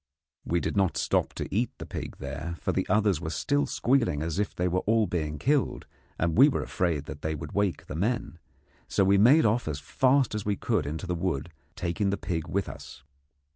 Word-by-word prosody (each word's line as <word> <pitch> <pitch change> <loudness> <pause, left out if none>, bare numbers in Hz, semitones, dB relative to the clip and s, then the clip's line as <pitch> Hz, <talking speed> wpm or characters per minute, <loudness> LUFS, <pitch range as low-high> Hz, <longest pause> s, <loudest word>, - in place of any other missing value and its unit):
We 85 - 0
did - - -3
not 95 -5 +2
stop - - +1
to - - -4
eat 120 +3 +2
the - - -7
pig - - -6
there, 75 +5 -5
for - - -1
the - - -1
others 100 -4 +2
were 80 - -3
still 145 - 0
squealing 120 - +1
as 85 +3 -2
if 105 - -1
they 90 - 0
were 90 +1 +1
all 110 0 +4
being 75 -5 -2
killed, 140 - 0 0.3
and 80 0 0
we 135 +6 +8
were 140 - -1
afraid 85 -7 -1
that 75 -1 -8
they 80 0 -2
would 75 0 -7
wake 100 -3 0
the - - -7
men; 100 -1 -1 0.5
so 100 - +2
we 100 +1 +4
made 135 +10 +6
off 110 0 +1
as 75 -2 -2
fast 130 - +2
as 105 -1 -2
we 105 -1 0
could 95 - -1
into 80 +5 -4
the 90 - -2
wood, 85 -3 -2 0.2
taking 95 +4 -1
the 100 - 0
pig 85 -5 -3
with 100 +1 -1
us. 65 - -10
95 Hz, 215 wpm, -28 LUFS, 80-110 Hz, 0.5 s, we